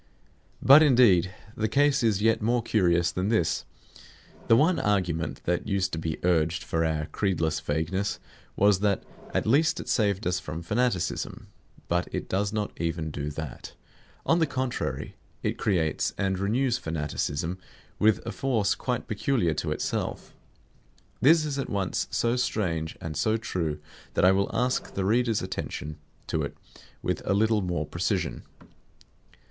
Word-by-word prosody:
But 140 +3 +9
indeed 115 - +5 0.2
the 110 - 0
case 140 +5 +3
is 105 -3 +1
yet 115 0 +3
more 120 +2 +1
curious 90 -5 +2
than 95 +2 -1
this. 110 -8 +1 0.8
The 115 - +6
one 160 +8 +3
argument 90 -5 -1
that 90 +3 -1
used 95 -2 0
to 80 - -3
be 80 -1 -3
urged 85 -1 +2
for 80 0 0
our 80 -1 0
creedless 85 -4 -1
vagueness 80 +7 -1 0.4
was 100 -1 +4
that 100 -1 +1 0.3
at - - 0
least 155 +8 +3
it - - -7
saved 100 -2 +1
us 90 +1 +1
from 80 +3 -6
fanaticism. 105 -2 -1 0.4
But 85 +1 0
it - - -4
does 100 +2 0
not 105 -1 -2
even 80 -1 -2
do 75 0 -4
that. 75 -2 -7 0.5
On 165 - +3
the 160 - +3
contrary, 130 -2 -3 0.3
it - - -1
creates 85 -7 0
and 95 -1 0
renews 120 +5 +1
fanaticism 80 +2 -3 0.4
with 110 +1 +3
a 115 - -3
force 110 -2 +1
quite 125 -2 -3
peculiar 110 - +1
to - - -3
itself. - - -3 0.9
This 155 +3 +5
is 140 -2 -2
at 135 - -3
once 100 -3 -1
so 120 +1 +1
strange 85 -10 -1
and 80 -2 -6
so 110 +4 +1
true 85 -9 -3 0.4
that - - +3
I 95 - +7
will 100 +1 +1
ask 125 +3 -1
the 95 - -1
reader's 115 0 +2
attention 85 -4 -5 0.3
to - - -1
it - - -5 0.5
with - - -1
a 100 - +1
little 110 +1 +3
more 85 -4 -2
precision. 85 +4 -2
100 Hz, 155 wpm, -27 LUFS, 85-115 Hz, 0.9 s, But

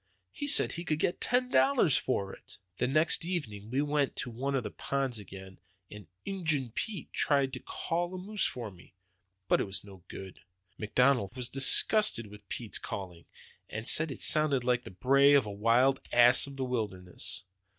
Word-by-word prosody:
He 285 - -6
said 295 - +3
he 170 - -6
could 155 -3 -2
get 175 - -2
ten 250 0 0
dollars 250 - +3
for 100 -7 -2
it. - - -12 0.2
The 125 - 0
next 155 +5 +3
evening 115 - -5
we 135 +4 -1
went 145 -2 -1
to 125 - -5
one 135 +4 -3
of 130 - -1
the 105 - -6
ponds 135 -4 -3
again, 95 -1 -12 0.3
and 105 -2 -12 0.2
Injun 160 - -2
Pete 210 - -6
tried 140 -2 0
to 125 - -6
'call' 175 +7 -4
a - - -6
moose 205 +3 -4
for 115 -4 -4
me. 90 0 -19 0.5
But - - +2
it - - -2
was 95 0 -6
no 95 -3 -15
good. 95 -1 -11 0.4
McDonald 120 0 0
was 125 -2 -3
disgusted 135 - +6
with 105 0 -15
Pete's 115 -3 -3
calling; 90 -4 -8 0.6
said 160 +7 +3
it - - -9
sounded 150 -4 +2
like 125 0 -1
the - - -8
bray 135 +9 +3
of 135 -5 +3
a 105 - -6
wild 115 +6 +2
ass 120 +2 +5
of 140 -1 -11
the 130 - -3
wilderness. 100 -10 -4
130 Hz, 180 wpm, -29 LUFS, 105-150 Hz, 0.6 s, disgusted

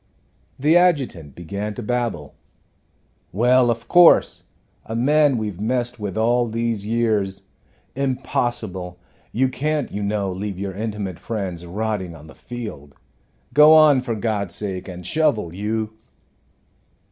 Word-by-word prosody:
The 150 +5 +3
adjutant 135 - +1
began 100 +5 -5
to 120 - -6
babble. 115 - -2 1.0
"Well, 125 +4 +3
of 115 0 -2
course 175 -1 +5 0.4
a 110 - -6
man 145 +2 +3
we've 105 -5 -4
messed 120 +1 -1
with 100 -2 -4
all 120 +2 +2
these 115 -2 -2
years 105 -4 0 0.5
impossible 120 -9 -2 0.3
you 130 +3 +2
can't, 150 +2 -2
you 105 - -4
know, 100 -1 -1
leave 95 +1 -5
your 95 0 -4
intimate 105 -3 -4
friends 95 -6 -5
rotting 100 -2 -3
on 75 -1 -13
the 80 - -13
field. 105 - -8 0.6
Go 150 +1 +8
on, 150 -4 +6
for 120 -3 -3
God's 105 -4 -2
sake, 95 -3 -4
and 90 -1 -8
shovel, 110 - +1
you!" 110 +3 -3
110 Hz, 130 wpm, -22 LUFS, 95-125 Hz, 1.0 s, Go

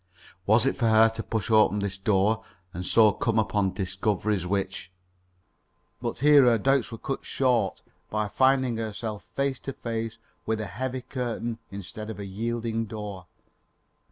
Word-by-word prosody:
Was 110 +4 +5
it 135 - +1
for 120 - +2
her 110 0 +6
to 115 0 -5
push 110 0 -3
open 110 -2 +5
this 100 -2 -3
door, 105 +2 +2 0.3
and 90 - -5
so 110 +3 +5
come 115 +3 -1
upon 105 -3 +1
discoveries 95 0 -1
which 95 0 -2 1.1
But - - -3
here 145 -1 +6
her 120 -2 +5
doubts 135 +2 +1
were 115 - -6
cut 135 +4 -4
short 125 -3 0 0.3
by 105 0 -1
finding 130 +1 +2
herself 110 -1 -4
face 140 -2 0
to 135 - -6
face 115 -2 -4 0.3
with 110 0 -1
a 110 - -3
heavy 125 +6 -4
curtain 120 -3 -3
instead 105 +2 -7
of 110 - -6
a 100 - -5
yielding 115 +3 -2
door. 105 -4 -7
110 Hz, 155 wpm, -27 LUFS, 100-120 Hz, 1.1 s, her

